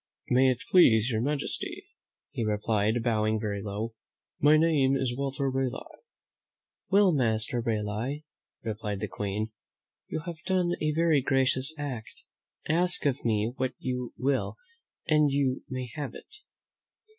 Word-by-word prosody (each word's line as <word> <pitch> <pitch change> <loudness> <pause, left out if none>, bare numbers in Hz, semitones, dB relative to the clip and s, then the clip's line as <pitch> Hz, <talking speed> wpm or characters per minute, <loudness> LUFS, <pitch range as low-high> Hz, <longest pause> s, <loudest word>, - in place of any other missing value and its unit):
"May 130 +1 +5
it 125 -2 -1
please 125 - +6
your 110 -1 0
majesty," 145 +3 -2 0.5
he 115 - -3
replied, 110 +1 +1
bowing 110 -2 +1
very 100 -2 -3
low, 105 +3 -4 0.5
"my 150 +2 +6
name 150 -4 +3
is 130 -3 -1
Walter 135 +1 -2
Raleigh." 130 -1 -3 0.9
"Well, 200 -1 +5
Master 120 -3 +1
Raleigh," 115 +6 -2 0.4
replied 105 -2 -3
the - - -2
Queen, 105 +2 -3 0.6
"you 155 - -3
have 165 -1 -7
done 185 -2 +2
a 155 - +1
very 160 -2 +3
gracious 135 +2 +2
act. 130 -7 -6 0.4
Ask 175 +2 +2
of 140 -1 +1
me 110 0 +1
what 130 -1 -1
you 125 -1 -3
will 135 +1 0 0.5
and 150 -2 +4
you 135 -2 0
may 130 -1 -3
have 145 -5 -5
it." - - -12
130 Hz, 135 wpm, -28 LUFS, 110-145 Hz, 0.9 s, please